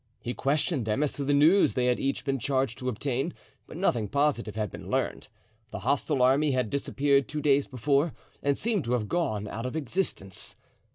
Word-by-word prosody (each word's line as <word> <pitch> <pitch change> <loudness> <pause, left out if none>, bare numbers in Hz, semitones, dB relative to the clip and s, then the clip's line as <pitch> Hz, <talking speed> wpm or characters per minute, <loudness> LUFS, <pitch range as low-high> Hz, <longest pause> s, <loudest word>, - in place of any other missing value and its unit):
He 120 - -4
questioned 140 -1 0
them 110 +7 +1
as 150 - -1
to 140 - -4
the 140 - 0
news 155 +8 +5
they 125 - +1
had 125 -1 +2
each 135 0 -1
been 135 -2 0
charged 130 -2 0
to 130 -1 -2
obtain, 135 +6 -2 0.3
but - - -9
nothing 120 - +1
positive 140 -5 0
had 105 -4 -2
been - - -9
learned. - - -1 0.4
The - - -6
hostile 140 0 +1
army 140 +3 +4
had 125 -4 0
disappeared 140 0 +1
two 150 - -4
days 145 -2 +3
before 140 +4 +1 0.3
and 140 -1 +1
seemed 220 -6 0
to 120 - 0
have 115 -4 0
gone 110 -12 -1
out 115 +4 -4
of 125 - -5
existence. 140 - -2
135 Hz, 195 wpm, -28 LUFS, 125-145 Hz, 0.4 s, news